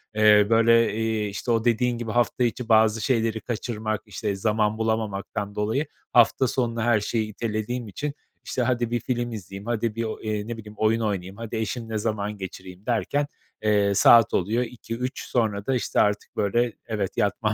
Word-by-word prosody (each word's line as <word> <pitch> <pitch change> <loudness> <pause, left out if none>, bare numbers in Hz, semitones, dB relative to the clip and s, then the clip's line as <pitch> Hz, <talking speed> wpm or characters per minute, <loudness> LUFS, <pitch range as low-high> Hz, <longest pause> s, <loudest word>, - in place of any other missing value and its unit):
eee, 105 -1 +6
böyle, 115 0 +4
iii, 110 -2 0
işte 105 +4 -3
o 115 0 +1
dediğin 120 +1 +2
gibi 115 -2 -4
hafta 120 +1 +1
içi 120 +1 -2
bazı 110 0 +4
şeyleri 115 -4 0
kaçırmak, 110 -2 -3
işte 105 0 -3
zaman 105 +1 +1
bulamamaktan 105 -2 -2
dolayı 110 +8 0 0.3
hafta 120 +2 +5
sonuna 115 -3 -1
her 120 -3 +3
şeyi 110 +1 -1
itelediğim 110 +2 -3
için 145 +9 -4 0.3
işte 125 - -2
hadi 120 -1 0
bir 120 - +1
film 120 -1 -2
izleyeyim, 100 -1 -8
hadi 115 -1 -1
bir 115 - -1
o, 110 - -4
eee, 105 -1 -3
ne 120 -1 -4
bileyim 105 -1 -10
oyun 110 +1 +2
oynayayım, 100 -2 -3
hadi 115 -1 -6
eşimle 110 0 -3
zaman 105 -1 -2
geçireyim 95 0 -9
derken, 140 +4 0 0.4
eee, 105 -2 +3
saat 115 +2 +7
oluyor 110 +7 +1
2-3 120 +1 -5
sonra 105 -5 0
da 135 - +1
işte 125 - 0
artık 105 0 +1
böyle 115 +3 +1
evet 105 -4 -3
yatmam 105 +1 +1
110 Hz, 175 wpm, -25 LUFS, 105-120 Hz, 0.4 s, saat